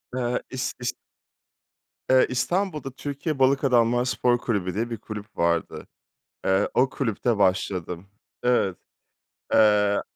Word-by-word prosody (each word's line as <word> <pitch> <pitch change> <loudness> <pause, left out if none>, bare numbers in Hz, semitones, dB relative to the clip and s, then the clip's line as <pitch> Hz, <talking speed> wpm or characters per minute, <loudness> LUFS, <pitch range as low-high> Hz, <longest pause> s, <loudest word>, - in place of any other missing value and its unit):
Eee, 125 -1 -1
is 130 0 -3
is 125 0 -2 1.2
Eee, 130 0 +6
İstanbul'da 150 +2 -1
Türkiye 140 +2 -4
Balık 135 +2 +3
Adamlar 120 -1 +3
Spor 125 -1 +2
Kulübü 100 -7 -2
diye 115 +4 -2
bir 115 - -4
kulüp 105 0 -9
vardı. 85 -1 -1 0.6
Eee, 95 +1 +2
o 130 +1 +3
kulüpte 115 -3 -1
başladım. 95 -2 0 0.4
Evet. 110 -7 +2 0.8
Eee 105 -2 +4
120 Hz, 120 wpm, -25 LUFS, 100-130 Hz, 1.2 s, Eee